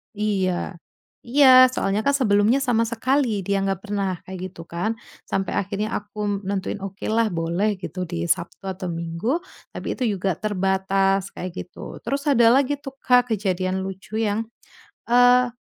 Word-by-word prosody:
Iya. 190 Hz, -4 st, -1 dB, 0.5 s
Iya, 255 Hz, 0 st, +7 dB
soalnya 200 Hz, -3 st, 0 dB
kan 280 Hz, -, +3 dB
sebelumnya 230 Hz, 0 st, +3 dB
sama 235 Hz, -4 st, +2 dB
sekali 240 Hz, -2 st, 0 dB
dia 200 Hz, +2 st, 0 dB
nggak 195 Hz, -1 st, -1 dB
pernah 200 Hz, -2 st, -1 dB
kayak 190 Hz, 0 st, -8 dB
gitu 170 Hz, -, -11 dB
kan, 190 Hz, +7 st, -1 dB, 0.3 s
sampai 195 Hz, 0 st, -2 dB
akhirnya 200 Hz, +2 st, -2 dB
aku 205 Hz, -1 st, -3 dB
nentuin, 195 Hz, +1 st, -2 dB
okelah 205 Hz, +3 st, -1 dB
boleh 170 Hz, +6 st, 0 dB
gitu, 180 Hz, 0 st, -4 dB
di 170 Hz, 0 st, -4 dB
Sabtu 170 Hz, +4 st, -1 dB
atau 190 Hz, 0 st, -5 dB
Minggu. 170 Hz, -, -2 dB, 0.3 s
Tapi -, -, -6 dB
itu 260 Hz, -, -2 dB
juga 190 Hz, -2 st, -1 dB
terbatas, 195 Hz, -1 st, 0 dB
kayak 185 Hz, -, -5 dB, 0.2 s
gitu. -, -, -10 dB
Terus 275 Hz, +1 st, -1 dB
ada 240 Hz, -4 st, +5 dB
lagi 280 Hz, +2 st, +2 dB
tuh, 275 Hz, -2 st, -9 dB
Kak, 250 Hz, -2 st, +4 dB
kejadian 190 Hz, -2 st, -1 dB
lucu 195 Hz, +3 st, -5 dB
yang, 220 Hz, +1 st, 0 dB, 0.6 s
eee, 245 Hz, +1 st, +5 dB
205 Hz, 150 wpm, -23 LUFS, 190-235 Hz, 0.6 s, Iya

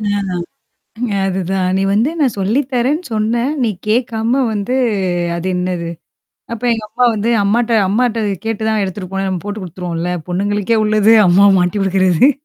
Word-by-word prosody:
அ -, -, -6 dB, 1.2 s
அது 190 Hz, 0 st, -1 dB
தான் 185 Hz, -1 st, 0 dB
"நீ 195 Hz, -, 0 dB
வந்து 225 Hz, +8 st, +2 dB
நான் 270 Hz, -7 st, +2 dB
சொல்லி 210 Hz, +8 st, +1 dB
தரேன்னு 275 Hz, +8 st, +1 dB
சொன்னேன். 235 Hz, +5 st, 0 dB
நீ 235 Hz, -, +2 dB, 0.2 s
கேக்காம 235 Hz, +2 st, +1 dB
வந்து 210 Hz, +4 st, -2 dB, 0.6 s
அது 170 Hz, +2 st, -4 dB
என்னது?" 180 Hz, -2 st, -2 dB, 0.6 s
அப்ப 230 Hz, -, -8 dB
எங்க 225 Hz, -, -4 dB
அப்பா 250 Hz, +2 st, +1 dB
வந்து, 215 Hz, +2 st, -1 dB
அம்மாட்ட 230 Hz, +3 st, +1 dB
அம்மாட்ட 230 Hz, +2 st, +1 dB, 0.2 s
கேட்டு 225 Hz, -1 st, -2 dB
தான் 215 Hz, -1 st, +1 dB
எடுத்துட்டு 185 Hz, -1 st, -5 dB
போனேன்னு 195 Hz, 0 st, -1 dB
நம்ம 175 Hz, -3 st, -4 dB
போட்டு 205 Hz, 0 st, -5 dB
குடுத்துருவோம்ல. 175 Hz, -1 st, -4 dB, 0.2 s
பொண்ணுங்களுக்கே 205 Hz, +4 st, 0 dB
உள்ளது, 215 Hz, +1 st, +4 dB
அம்மாவ 195 Hz, +3 st, +6 dB
மாட்டி 180 Hz, +3 st, 0 dB
குடுக்கறது. 190 Hz, -, +3 dB
205 Hz, 155 wpm, -16 LUFS, 185-230 Hz, 1.2 s, அம்மாவ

